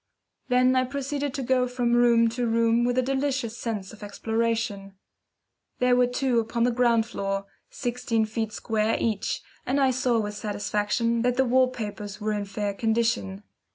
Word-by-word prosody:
Then 255 +1 +4
I 255 - +3
proceeded 280 +1 -3
to 275 - -3
go 255 0 +2
from 245 -1 0
room 235 -1 +5
to 240 +1 -2
room 230 +1 +2
with 245 0 0
a 255 - +3
delicious 265 -3 -1
sense 210 -5 -4
of 215 - -14
exploration. 220 -1 -2 0.8
There 250 0 +3
were 250 0 +4
two 250 -1 +1
upon 230 +1 -1
the 245 - +3
ground 235 -2 +3
floor, 195 -3 -3 0.2
sixteen 240 -3 -1
feet 220 0 -3
square 220 0 0
each, 215 -4 -1 0.2
and 270 +3 0
I 265 -1 +4
saw 250 -1 +1
with 210 -1 -3
satisfaction 210 +3 -1
that 245 0 +1
the 265 - +4
wall 255 +1 +4
papers 210 -4 -6
were 215 0 -1
in 205 -1 -2
fair 200 +1 -3
condition. 220 -2 0
230 Hz, 170 wpm, -26 LUFS, 215-250 Hz, 0.8 s, room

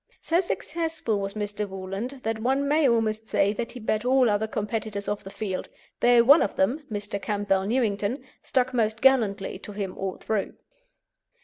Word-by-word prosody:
So 335 +1 +1
successful 325 - -1
was 195 +1 -4
Mr. 210 -1 -3
Woolland 195 +8 -5
that 225 0 -1
one 265 +5 +1
may 295 -1 +4
almost 220 -1 0
say 200 +1 +2
that 230 +2 -4
he 250 - -8
beat 215 -1 -1
all 255 -2 +4
other 205 +1 0
competitors 210 -1 -3
off 205 0 -2
the 195 - -8
field, 200 -2 -4 0.3
though 240 -1 +6
one 285 +7 +7
of 200 - 0
them, 235 +11 +1
Mr. 205 -1 -3
Campbell 200 -2 0
Newington, 230 +1 0 0.2
stuck 255 0 0
most 220 -2 +1
gallantly 215 -7 +2
to 205 - -9
him 200 -2 -4
all 190 -1 -4
through. 215 -3 -2
220 Hz, 175 wpm, -26 LUFS, 200-250 Hz, 0.3 s, one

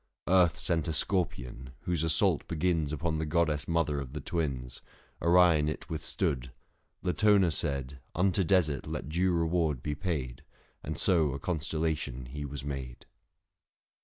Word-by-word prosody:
Earth 90 -3 +4
sent 85 -2 +1
a 80 - -1
scorpion, 65 -8 -1
whose 90 -3 -1
assault 80 +1 +2
begins 80 -2 0
610 75 - -2
Upon 80 0 -1
the 80 - -1
goddess 75 -3 +1
mother 85 -4 +1
of 70 -1 -7
the 75 - -4
Twins 65 -6 -3 0.2
— - - -33
Orion 85 -3 +5
it 75 - -6
withstood: 65 -4 -2 0.5
Latona 95 0 +4
said, 70 -2 -1 0.2
Unto 95 +2 +2
desert 80 -7 +1
let 70 - -4
due 90 +4 +1
reward 80 -5 0
be 75 - -1
paid, 75 -6 -3 0.4
And - - -4
so 80 -7 +3
a 70 - -5
constellation 80 -5 -2
he 75 +4 -6
was 70 -1 -6
made. 65 -4 -6
80 Hz, 150 wpm, -30 LUFS, 70-85 Hz, 0.5 s, Orion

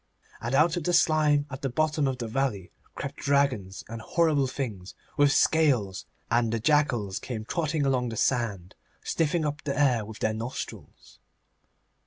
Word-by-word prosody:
And 120 +4 -1
out 160 +4 +4
of 165 - -4
the 175 - +1
slime 150 -3 +3
at 130 - -7
the 135 - -1
bottom 150 +2 +1
of 130 -1 -2
the 120 -2 -4
valley 110 -7 -2 0.2
crept - - -6
dragons 130 -9 0
and 115 0 -7
horrible 155 0 +2
things 110 -9 -5 0.2
with 145 0 +4
scales, 130 -14 +2 0.2
and 115 -1 +2
the 115 - -1
jackals 120 -8 +1
came 110 -4 -6
trotting 155 +1 -1
along 125 -3 +1
the 110 - -6
sand, 105 -9 -1 0.3
sniffing 165 0 0
up 150 0 -3
the 140 -1 -2
air 125 -6 +3
with 110 0 -9
their 110 - 0
nostrils. 115 +4 -7
135 Hz, 165 wpm, -27 LUFS, 110-150 Hz, 0.3 s, out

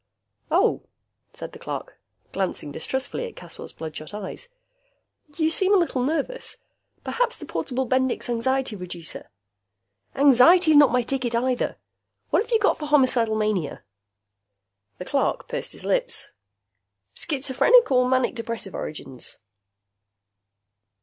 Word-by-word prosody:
"Oh," - - +3 0.5
said - - -8
the - - -12
clerk, - - -6 0.3
glancing 185 -6 -2
distrustfully 265 - -3
at 465 - -12
Caswell's - - -9
bloodshot 155 +3 -7
eyes. 210 - -6 0.9
"You 320 -1 +2
seem 390 +4 +3
a - - +6
little 335 -8 0
nervous. 315 - -1 0.5
Perhaps 485 0 0
the - - -9
portable 260 0 -2
Bendix 260 0 0
Anxiety 250 0 0
Reducer 175 -3 -7 0.4
" 100 0 -46
"Anxiety's 315 +5 +7
not 290 -1 +7
my 250 -1 +2
ticket, 245 -2 -1
either. 250 +1 0 0.5
What - - +4
have 455 - -6
you 460 - +4
got 430 -1 +2
for 300 - -4
homicidal 255 -6 +3
mania?" 210 -8 -1 1.1
The 180 - -7
clerk 275 +6 0
pursed - - -3
his - - -8
lips. - - 0 0.8
"Schizophrenic 285 - +3
or 250 -1 +4
manic 255 -1 +2
depressive 230 -4 -5
origins?" 135 -4 -6
260 Hz, 125 wpm, -24 LUFS, 215-315 Hz, 1.1 s, Anxiety's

